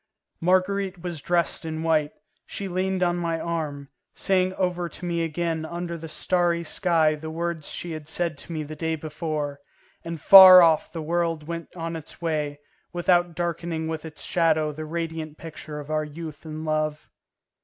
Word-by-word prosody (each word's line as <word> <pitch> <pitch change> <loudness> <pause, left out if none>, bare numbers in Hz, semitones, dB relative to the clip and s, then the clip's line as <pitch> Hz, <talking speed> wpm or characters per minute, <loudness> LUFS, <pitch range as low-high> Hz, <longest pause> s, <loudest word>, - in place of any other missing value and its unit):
Marguerite 185 +1 +1
was 170 -4 -5
dressed 175 +1 0
in 160 0 -4
white, 155 -2 +2 0.4
she 200 - -4
leaned 185 0 -1
on 175 0 +1
my 165 -1 -1
arm, 150 -5 -4 0.3
saying 185 -1 +2
over 180 -2 -1
to 180 - -8
me 170 -1 0
again 165 0 -2
under 170 +1 -4
the 165 -1 -8
starry 170 +1 +1
sky 165 -2 +2
the 155 +1 -6
words 165 -1 -3
she 175 - -5
had 155 -2 -7
said 165 0 -1
to - - -9
me 155 -2 -3
the 155 +1 -8
day 160 +1 -1
before, 150 -2 -4 0.4
and 165 -1 -5
far 185 +1 +11
off 160 -2 +3
the 165 -2 -5
world 165 -1 -1
went 170 0 -6
on 165 -1 -4
its 160 -2 -9
way, 150 -3 -2 0.3
without 175 -1 +2
darkening 170 -1 -2
with 160 -1 -4
its 160 -2 -9
shadow 160 -3 +2
the 155 +1 -7
radiant 160 -1 -4
picture 155 -2 -8
of 145 +1 -8
our 155 0 +1
youth 155 0 -8
and 155 0 -6
love. 155 -1 -1
165 Hz, 175 wpm, -25 LUFS, 155-175 Hz, 0.4 s, far